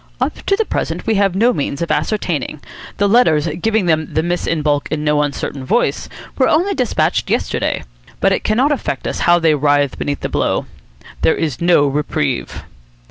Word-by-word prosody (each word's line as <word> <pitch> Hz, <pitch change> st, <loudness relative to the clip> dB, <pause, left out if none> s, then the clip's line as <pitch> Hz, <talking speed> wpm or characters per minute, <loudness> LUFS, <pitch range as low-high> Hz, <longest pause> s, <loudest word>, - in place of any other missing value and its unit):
"Up -, -, -2 dB
to 395 Hz, -, +4 dB
the 445 Hz, +2 st, 0 dB
present -, -, -3 dB
we 225 Hz, -, +1 dB
have 195 Hz, -3 st, +2 dB
no 235 Hz, +5 st, +3 dB
means 140 Hz, -3 st, -3 dB
of 170 Hz, -, -3 dB
ascertaining. 170 Hz, -, -1 dB, 0.4 s
The 200 Hz, -, +2 dB
letters 195 Hz, -9 st, +4 dB, 0.2 s
giving 220 Hz, -3 st, +1 dB
them 160 Hz, -2 st, 0 dB
the 155 Hz, -, 0 dB
miss 175 Hz, +1 st, -2 dB
in 160 Hz, -2 st, -1 dB
baulk 145 Hz, -1 st, +1 dB
in 155 Hz, -1 st, -2 dB
no 150 Hz, 0 st, +2 dB
uncertain 140 Hz, -1 st, -3 dB
voice 225 Hz, -, 0 dB, 0.3 s
were 260 Hz, -, +4 dB
only 360 Hz, +6 st, +2 dB
despatched 250 Hz, -, 0 dB
yesterday. -, -, -1 dB, 0.4 s
But -, -, +3 dB
it -, -, 0 dB
cannot 250 Hz, +7 st, +2 dB
affect 290 Hz, -, -2 dB
us -, -, -3 dB
how 175 Hz, -, +7 dB
they 165 Hz, -2 st, +3 dB
writhe 145 Hz, -1 st, +1 dB
beneath 145 Hz, -1 st, -3 dB
the -, -, -2 dB
blow. -, -, 0 dB, 0.6 s
There -, -, +3 dB
is 155 Hz, -4 st, -3 dB
no 170 Hz, -4 st, +4 dB
reprieve." 145 Hz, -1 st, -2 dB
165 Hz, 190 wpm, -17 LUFS, 150-220 Hz, 0.6 s, how